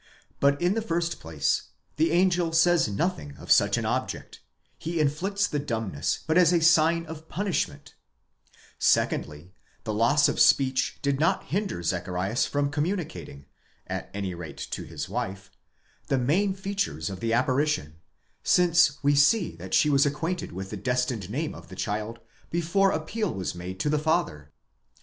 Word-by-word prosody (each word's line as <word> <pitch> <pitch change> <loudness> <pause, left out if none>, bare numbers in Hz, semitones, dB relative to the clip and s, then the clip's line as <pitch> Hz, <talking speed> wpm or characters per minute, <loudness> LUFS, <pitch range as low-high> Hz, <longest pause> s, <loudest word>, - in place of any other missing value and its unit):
® - - -33 0.4
But, 140 0 +3
in 175 +2 +2
the 225 - -1
first 170 -4 -2
place, 75 -3 -1 0.3
the 160 +2 +3
angel 175 -1 +2
says 170 -1 +4
nothing 100 - -2
of - - -6
such - - +5
an - - -2
object, - - -3 0.4
he 165 0 -3
inflicts 185 +8 +1
the 150 - -2
dumbness 110 - -2
but 160 +3 +3
as 175 -2 +5
a 175 - +4
sign 165 0 +4
and 160 0 -10
punishment; 170 -7 -3 0.9
secondly, 75 +5 0 0.3
the 110 - -3
loss 120 +7 +4
of - - -2
speech 135 -1 +3
did 140 -1 0
not 160 - +2
hinder 195 - -2
Zacharias 90 +5 -1
from 145 0 -1
communicating, 155 - -4 0.4
at - - -5
any 100 -2 -4
rate 85 -2 -8
to - - -3
his - - -6
wife, 95 +1 -5 0.6
the 135 - +1
main 180 +10 +1
features 195 - -3
of 95 - -7
the 115 +2 -1
apparition, 130 - 0 0.4
since 175 -5 +4
we 145 +1 +4
see 145 - +3
that 95 +2 -3
she 150 - +4
was 140 0 +4
acquainted 165 +5 -3
with 95 +2 -7
the - - -4
destined 125 -6 -1
name 150 +8 -3
of 85 0 -12
the 95 - -11
child 105 +3 -3 0.3
before 175 +4 +2
appeal 205 +6 -2
was 95 -1 -4
made 90 +2 -7
to - - -1
the 150 - +2
father. 75 - -1
145 Hz, 165 wpm, -26 LUFS, -, 0.9 s, such